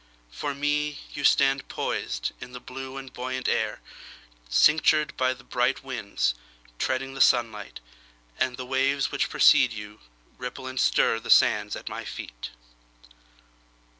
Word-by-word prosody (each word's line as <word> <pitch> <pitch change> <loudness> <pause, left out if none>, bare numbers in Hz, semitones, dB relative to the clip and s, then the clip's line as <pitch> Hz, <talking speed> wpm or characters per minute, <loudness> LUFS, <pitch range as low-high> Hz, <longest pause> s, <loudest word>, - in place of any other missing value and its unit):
For 140 - -4
me, 145 +1 0 0.2
You 145 - -5
stand 135 -1 +3
poisedIn 60 - -4
the 125 - -7
blue 130 +2 -8
and 135 -2 -9
buoyant 130 +1 -4
air, - - 0 0.7
Cinctured 150 - +4
by 130 0 +1
bright 125 +1 -1
winds, 120 - -1 0.5
Treading 135 +1 -1
the 135 - -3
sunlight. 115 -4 +2 0.6
And 125 -1 0
the 130 - -5
waves 135 +2 +1
which - - 0
precede 125 - +6
youRipple 105 - -10
and 130 0 -4
stirThe 115 +1 +2
sands 105 -1 +4
at - - -10
my - - -5
feet. - - -7
130 Hz, 125 wpm, -26 LUFS, 115-135 Hz, 0.7 s, precede